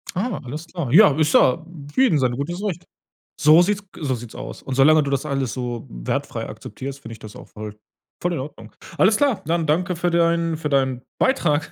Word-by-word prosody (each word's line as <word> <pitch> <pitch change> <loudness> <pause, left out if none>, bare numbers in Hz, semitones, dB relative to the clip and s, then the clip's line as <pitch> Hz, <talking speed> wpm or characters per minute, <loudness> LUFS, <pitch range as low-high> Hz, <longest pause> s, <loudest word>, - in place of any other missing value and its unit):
Ah, 225 +7 -2
alles 150 +7 -7
klar. 165 -8 -4
Ja, 195 +3 +8
ist 155 -1 +2
ja 160 +6 +4 0.3
für 260 - +2
jedem 220 - +4
sein 125 -2 +1
gutes 170 +7 -4
Recht. 175 -4 -3 0.5
So 155 +4 +7
sieht's 205 +2 0
g - - -13
so 135 -3 0
sieht's 120 -1 -8
aus - - -8
und 130 - -4
solange 155 +3 +6
du 140 - -2
das 140 +2 -1
alles 135 -5 -1
so 120 -1 -4
wertfrei - - -4
akzeptierst, 140 +1 -8
finde 115 -3 -9
ich 110 - -14
das 110 -2 -11
auch - - -12
voll 105 -1 -8 0.5
voll 175 0 0
in 165 - -2
Ordnung. 130 -5 -8 0.2
Alles 210 +3 +4
klar, 240 -7 +1
dann 165 0 0
danke 175 +4 0
für 175 +1 0
deinen 170 -1 +2
für 150 -1 -3
deinen 130 -2 +1 0.2
Beitrag. 165 - +1
150 Hz, 215 wpm, -22 LUFS, 130-175 Hz, 0.5 s, Ja